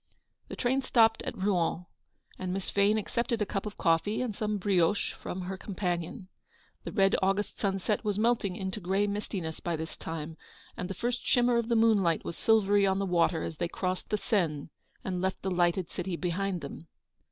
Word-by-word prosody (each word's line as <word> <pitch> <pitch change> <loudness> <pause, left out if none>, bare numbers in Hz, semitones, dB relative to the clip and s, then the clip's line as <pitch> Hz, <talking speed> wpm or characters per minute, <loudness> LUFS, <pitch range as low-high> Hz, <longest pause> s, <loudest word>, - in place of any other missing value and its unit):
The - - -6
train 265 +2 +1
stopped 225 -3 +4
at - - -5
Rouen, 180 -3 0 0.5
and 185 -1 -3
Miss 190 +1 -3
Vane 205 +2 +3
accepted 235 +2 -1
a 210 - +1
cup 195 +1 -3
of 210 - -7
coffee 165 +6 +2
and 225 -5 -3
some 210 0 -1
brioches 195 0 +2
from 185 - -5
her 190 +1 -4
companion. 180 0 -3 0.6
The - - -4
red 195 -2 +3
August 195 +2 0
sunset 195 +2 0
was 205 -2 0
melting 215 -4 +1
into 190 +2 -4
grey 195 +2 +1
mistiness 200 -5 -3
by 170 -1 -2
this 160 +1 -5
time, 160 0 -6 0.4
and 180 - -4
the 195 - -4
GOING - - -14
HOME. 240 - +2
IP, - - -4
first 245 - -5
shimmer 245 -1 +4
of 235 0 -1
the 235 - +3
moonlight 210 -7 +3
was 170 - -4
silvery 205 -2 +4
on 190 0 +2
the 195 - 0
water 170 -2 +2
as 160 - -5
they 175 - 0
crossed 185 +1 -3
the 210 - +1
Seine 165 -10 0 0.3
and 180 -2 -2
left 190 0 -2
the 190 - -1
lighted 175 0 +2
city 180 0 -4
behind 180 +1 -1
them. 145 +3 -8
195 Hz, 200 wpm, -30 LUFS, 175-210 Hz, 0.6 s, stopped